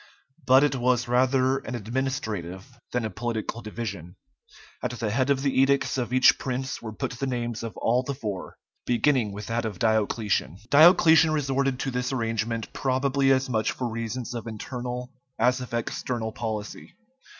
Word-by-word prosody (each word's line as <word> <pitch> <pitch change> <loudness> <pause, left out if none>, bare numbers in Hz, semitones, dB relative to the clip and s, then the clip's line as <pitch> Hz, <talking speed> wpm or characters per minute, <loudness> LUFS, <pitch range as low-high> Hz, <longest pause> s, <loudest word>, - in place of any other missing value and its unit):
But 130 +2 +7
it 145 -2 +2
was 125 0 +1
rather 130 +2 +2
an 125 - -6
administrative 115 -3 -4
than 125 -2 -1
a 110 - -3
political 115 +2 -3
division. 100 -5 -6 0.7
At - - -1
the 110 -3 -1
head 130 +4 +1
of 135 -1 +2
the 140 - +1
edicts 135 0 +2
of 125 -2 -2
each 130 0 +5
prince 130 +1 -3
were 110 - -6
put 105 - -4
the 135 - -1
names 120 -3 -3
of 115 -2 -6
all 120 +2 +2
the 140 +2 -4
four, 105 -8 -6 0.3
beginning 125 -2 +2
with 105 +1 -7
that 115 +2 -1
of 110 -4 -4
Diocletian. 105 - 0
Diocletian 160 +1 +7
resorted 135 -3 0
to 135 - -2
this 125 0 -2
arrangement 115 -2 -2
probably 135 +1 +1
as 135 0 +2
much 110 -4 0
for 125 - -3
reasons 115 +2 -4
of 120 -1 -5
internal 125 +3 -5 0.3
as 125 +1 +2
of 125 - -7
external 115 0 -3
policy. 110 - -5
125 Hz, 165 wpm, -26 LUFS, 110-130 Hz, 0.7 s, But